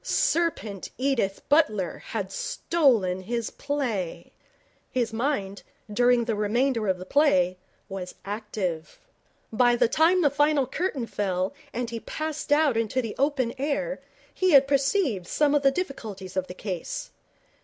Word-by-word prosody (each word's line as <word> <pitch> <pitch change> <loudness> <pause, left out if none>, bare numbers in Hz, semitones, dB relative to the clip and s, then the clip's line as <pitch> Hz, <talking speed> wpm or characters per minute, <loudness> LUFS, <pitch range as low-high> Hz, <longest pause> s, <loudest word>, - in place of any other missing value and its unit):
Serpent 330 - 0
Edith 250 -7 -1
Butler 270 - +2
had - - -3
stolen 275 - +1
his 235 +3 -3
play. 250 - -3 0.6
His 235 -3 -1
mind, 225 -5 -1 0.3
during 245 +1 +4
the 230 - 0
remainder 225 +2 +1
of 190 -1 +1
the 185 - -8
play, 185 - +3 0.3
was 190 -2 -6
active. 200 -5 -4 0.6
By 240 +1 +4
the 240 - +3
time 335 +8 +3
the 290 - +4
final 290 -1 +3
curtain 280 -2 -2
fell 190 -1 -1 0.2
and 240 -1 -3
he 230 - -4
passed 310 +3 -5
out 290 -5 +4
into 230 +3 0
the 230 -4 -3
open 270 -4 +1
air 305 - -1 0.3
he 370 -3 +2
had 275 -1 +7
perceived 275 - +1
some 295 -1 +2
of 290 - +3
the 275 - +5
difficulties 220 - -5
of 185 -1 -1
the 180 - -8
case. 185 -3 -5
245 Hz, 145 wpm, -26 LUFS, 200-290 Hz, 0.6 s, had